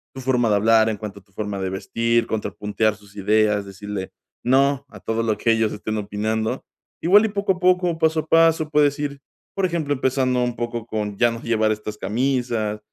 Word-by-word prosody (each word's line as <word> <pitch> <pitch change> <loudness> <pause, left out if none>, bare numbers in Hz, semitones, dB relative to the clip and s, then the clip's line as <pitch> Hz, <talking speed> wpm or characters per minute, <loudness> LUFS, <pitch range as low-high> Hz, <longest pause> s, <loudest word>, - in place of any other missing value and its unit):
tu 130 - -6
forma 125 -3 +1
de 105 - +3
hablar, 110 +2 +4
en 110 - -2
cuanto 105 -1 -7
a 95 - -23
tu 100 - -33
forma 105 -1 -4
de 95 - -2
vestir, 115 +4 0
contrapuntear 105 0 -1
sus 100 -2 -19
ideas, 105 0 +2
decirle 100 0 -6 0.3
"no" 140 +2 +2
a - - -12
todo 115 0 -1
lo 110 -2 0
que 115 - +2
ellos 110 -1 +1
estén 110 +1 -4
opinando. 110 +4 -2 0.4
Igual 205 +6 +6
y - - 0
poco 200 -1 0
a 180 - -11
poco, 180 -2 +2
paso 160 -1 +2
a - - -14
paso 165 -1 +4
puedes 150 -1 +3
ir, 140 -1 -3 0.4
por 195 - +1
ejemplo, 165 -5 -1
empezando 130 -2 +1
un 120 -1 -2
poco 120 -1 -4
con 105 -2 -3
ya 120 +1 +3
no 115 0 -6
llevar 110 -2 +1
estas 105 0 -4
camisas, 115 -3 -1
115 Hz, 205 wpm, -22 LUFS, 105-140 Hz, 0.4 s, Igual